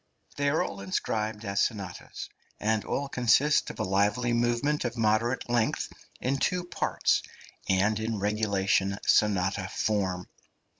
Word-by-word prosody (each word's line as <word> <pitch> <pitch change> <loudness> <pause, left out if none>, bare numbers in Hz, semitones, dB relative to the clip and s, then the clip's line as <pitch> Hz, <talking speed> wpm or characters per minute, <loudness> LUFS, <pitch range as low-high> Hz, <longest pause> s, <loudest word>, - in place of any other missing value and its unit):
They 145 0 +1
are 155 - +2
all 100 - -6
inscribed 105 +3 -2
as 100 0 0
sonatas, 100 -5 -3 0.3
and 110 -1 +1
all 140 - -2
consist 135 +4 +3
of - - -9
a - - +1
lively 105 +6 +1
movement 120 +5 +1
of 120 -1 -3
moderate 115 +3 +1
length 120 -2 0 0.3
in 135 +2 0
two 180 +6 0
parts, 175 +1 0 0.5
and 100 +3 +2
in 110 0 -2
regulation 100 -1 +1
sonata 95 -2 +2
form. 95 -4 -1
110 Hz, 135 wpm, -28 LUFS, 100-120 Hz, 0.5 s, consist